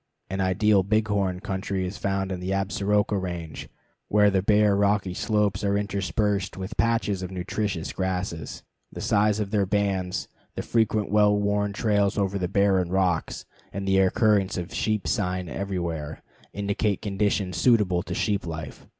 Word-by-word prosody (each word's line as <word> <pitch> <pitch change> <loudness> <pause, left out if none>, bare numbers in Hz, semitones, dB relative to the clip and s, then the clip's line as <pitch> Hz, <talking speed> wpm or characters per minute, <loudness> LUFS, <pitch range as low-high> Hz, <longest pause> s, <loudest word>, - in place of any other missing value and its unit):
An 95 0 -1
ideal 100 +2 +3
bighorn 100 -2 0
country 95 -2 -2
is 90 +3 -6
found 95 -1 -1
in 90 - -3
the 90 +1 -5
Absaroka 100 +1 +1
Range, 85 -4 -6 0.4
where 105 0 +4
the 95 -1 +2
bare 105 +1 +4
rocky 100 -2 +1
slopes 105 -1 0
are 100 0 +2
interspersed 100 0 -1
with 95 +3 -6
patches 115 -4 +1
of 90 - -4
nutritious 95 -1 -3
grasses. 95 -3 -3 0.3
The - - -8
size 105 +1 +2
of 100 -2 -3
their 100 -3 +1
bands, 95 -3 -1 0.3
the - - -3
frequent 110 -3 +1
well 105 -1 +4
worn 105 0 0
trails 105 -1 +1
over 100 -1 0
the 90 - -1
barren 95 -2 +2
rocks, 90 -3 0 0.3
and 100 0 -5
the 95 0 +4
occurrence 100 0 +2
of 90 +1 -5
sheep 110 -2 -1
"sign" 90 -5 -1
everywhere, 85 -4 -4 0.3
indicate 100 0 -1
conditions 100 -2 0
suitable 105 -8 +3
to 90 0 -5
sheep 100 -3 -1
life. 80 -1 -7
100 Hz, 155 wpm, -25 LUFS, 95-105 Hz, 0.4 s, where